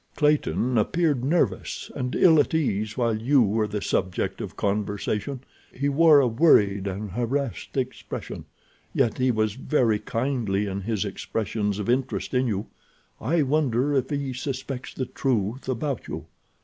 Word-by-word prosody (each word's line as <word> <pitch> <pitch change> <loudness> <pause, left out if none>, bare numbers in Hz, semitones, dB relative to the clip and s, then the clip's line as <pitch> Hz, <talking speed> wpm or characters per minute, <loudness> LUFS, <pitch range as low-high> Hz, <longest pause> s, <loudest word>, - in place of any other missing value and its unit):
Clayton 145 -5 +2
appeared 150 +1 +1
nervous 160 +6 0
and 125 -2 -3
ill 160 -4 +6
at 145 - +2
ease 110 -8 -1
while 115 -3 +1
you 130 +2 +4
were 105 +1 +1
the 105 0 -4
subject 95 -2 -1
of - - -7
conversation. 105 +5 -2 0.3
He 140 +3 -1
wore 155 +1 +6
a 135 - +3
worried 105 - +4
and 100 +1 -4
harassed 125 +5 -2
expression. 130 -1 -4 0.5
Yet 125 -4 +1
he 130 0 +3
was 110 -3 +1
very 125 -4 +1
kindly 115 -3 -1
in 100 0 -3
his 105 0 -1
expressions 105 0 -2
of 105 - -4
interest 130 +2 -1
in 125 0 +2
you. 105 -2 -2 0.5
I 160 +1 +1
wonder 140 -1 +1
if 130 -2 +1
he 140 -3 -2
suspects 130 0 -5
the 130 - -2
truth 125 -1 -1
about 130 +1 -2
you? - - -6
125 Hz, 150 wpm, -25 LUFS, 105-140 Hz, 0.5 s, ill